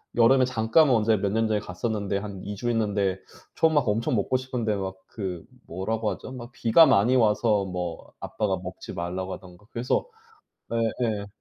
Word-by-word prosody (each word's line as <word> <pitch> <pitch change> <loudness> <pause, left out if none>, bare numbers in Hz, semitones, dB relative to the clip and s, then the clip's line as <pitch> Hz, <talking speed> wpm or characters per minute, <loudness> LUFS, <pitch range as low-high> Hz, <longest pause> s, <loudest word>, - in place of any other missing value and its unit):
여름에 130 +3 +5
잠깐 130 +5 +3
언제 110 -3 +3
몇 100 0 -1
년 110 +1 +1
전에 110 -1 +1
갔었는데 100 +1 -3
한 100 -2 -6
2 105 - -5
주 120 +4 -3
있는데 100 -4 0 0.4
전 160 -1 +3
막 145 -5 +2
엄청 110 +3 +1
먹고 110 +5 +1
싶은데 125 -4 -2
막 95 -1 -4
그 95 -6 -5 0.2
뭐라고 105 +5 -2
하죠 95 +7 -7
막 120 -1 -8
비가 120 +7 +5
많이 120 0 +4
와서 105 -3 +3
뭐 90 -2 -5
아빠가 100 -3 -2
먹지 90 +1 -8
말라고 90 +2 -4
하던가 90 +1 -12
그래서 120 - -1 0.7
예예. 115 -2 -1
105 Hz, 315 characters per minute, -26 LUFS, 95-120 Hz, 0.7 s, 여름에